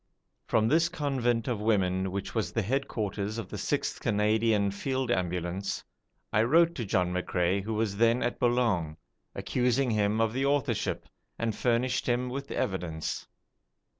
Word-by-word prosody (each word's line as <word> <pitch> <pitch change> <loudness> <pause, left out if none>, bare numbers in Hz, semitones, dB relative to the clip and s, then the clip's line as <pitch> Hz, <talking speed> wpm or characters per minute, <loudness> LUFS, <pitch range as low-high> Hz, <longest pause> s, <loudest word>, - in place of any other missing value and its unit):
From 110 -1 +3
this 165 +6 +3
convent 130 -8 0
of 120 -5 -1
women 95 -3 +1
which 100 +1 -4
was 110 -3 -1
the 115 - 0
headquarters 110 -3 -2
of 115 - -5
the - - -5
6th - - -1
Canadian 105 -1 +2
Field 130 +6 -2
Ambulance, 90 +2 -2 0.5
I 110 - +4
wrote 165 +8 +4
to 120 - -4
John 90 -2 +1
McCrae, 90 +1 0
who 110 +3 -3
was 105 -2 -1
then 115 +2 +3
at 120 - -2
Boulogne, 115 -11 +1 0.4
accusing 125 +1 +1
him 105 0 +1
of 115 -1 +2
the 130 +2 0
authorship, 140 -5 0 0.3
and 115 -2 -1
furnished 125 +1 +1
him 125 +1 +1
with 140 +2 -5
evidence. 85 -5 -3
110 Hz, 150 wpm, -29 LUFS, 100-125 Hz, 0.5 s, I